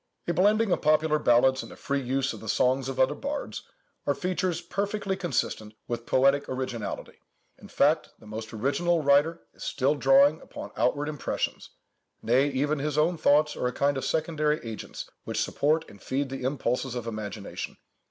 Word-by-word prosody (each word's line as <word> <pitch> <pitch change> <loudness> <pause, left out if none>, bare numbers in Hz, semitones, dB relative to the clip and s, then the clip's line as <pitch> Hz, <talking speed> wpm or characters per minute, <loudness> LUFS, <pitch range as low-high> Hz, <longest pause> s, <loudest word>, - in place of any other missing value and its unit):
A 170 - +1
blending 205 +4 +3
of - - +1
popular 155 0 +3
legends, 130 0 +4
and - - -10
a - - -10
free 140 0 -2
use 135 +1 0
of 110 - -9
the 110 - -7
songs 130 +3 +2
of 135 - -5
other 130 - +4
bards, 285 +1 -4 0.5
are 145 - +2
features 180 +2 -1
perfectly 200 +2 -2
consistent 110 - -2
with 120 -1 -4
poetical 135 0 +3
originality. 125 -4 -5 0.4
In - - -12
fact, 150 +2 +2
the - - -18
most 110 +1 -6
original 150 +9 +1
writer 145 +4 +3
is - - -11
still 140 +1 +1
drawing 275 - +5
upon - - -9
outward 145 0 +1
impressions—nay, 135 -3 -2
even 145 +2 0
his 150 +1 -2
own 165 +3 +3
thoughts 150 -1 +3
are 125 - -1
a - - -1
kind 140 0 +1
of 135 - -3
secondary 155 -1 0
agents 110 -1 -6 0.2
which - - -3
support 155 +3 +1
and 100 - -15
feed 135 +1 -2
the 135 - -5
impulses 130 -1 -1
of 120 -2 -4
imagination. 105 -2 -5
140 Hz, 170 wpm, -27 LUFS, 130-160 Hz, 0.5 s, drawing